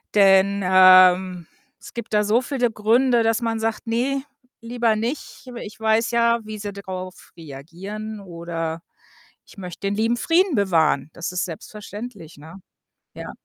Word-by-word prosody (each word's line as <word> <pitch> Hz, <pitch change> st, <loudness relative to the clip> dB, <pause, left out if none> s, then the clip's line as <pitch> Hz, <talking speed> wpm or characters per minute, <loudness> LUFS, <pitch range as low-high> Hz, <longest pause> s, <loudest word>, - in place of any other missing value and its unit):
Denn, 195 Hz, 0 st, +4 dB
ähm, 185 Hz, -1 st, +5 dB, 0.3 s
es -, -, -13 dB
gibt 235 Hz, -2 st, -7 dB
da 210 Hz, 0 st, +3 dB
so 215 Hz, +4 st, +2 dB
viele 255 Hz, -2 st, -1 dB
Gründe, 235 Hz, +3 st, +2 dB
dass 225 Hz, +1 st, +1 dB
man 225 Hz, -1 st, -2 dB
sagt: 225 Hz, +1 st, -3 dB
„Ne, 265 Hz, +4 st, -1 dB, 0.4 s
lieber 230 Hz, -1 st, 0 dB
nicht, 235 Hz, +8 st, -5 dB
aber 245 Hz, -2 st, -8 dB
ich 215 Hz, +1 st, -11 dB
weiß 220 Hz, +1 st, +1 dB
ja, 235 Hz, 0 st, +2 dB
wie 215 Hz, 0 st, -8 dB
sie 205 Hz, 0 st, -6 dB
darauf 185 Hz, -2 st, -8 dB
reagieren 180 Hz, +9 st, -8 dB
oder 170 Hz, -3 st, -5 dB, 0.6 s
ich -, -, -18 dB
möchte 180 Hz, +1 st, -6 dB
den 200 Hz, -, -1 dB
lieben 225 Hz, +3 st, 0 dB
Frieden 340 Hz, +3 st, +2 dB
bewahren.“ 160 Hz, -7 st, +1 dB
Das 170 Hz, +1 st, -5 dB
ist 180 Hz, -, -2 dB
selbstverständlich, 205 Hz, 0 st, -9 dB
ne? 160 Hz, +5 st, -13 dB, 0.6 s
Ja. -, -, -8 dB
210 Hz, 150 wpm, -22 LUFS, 185-230 Hz, 0.6 s, ähm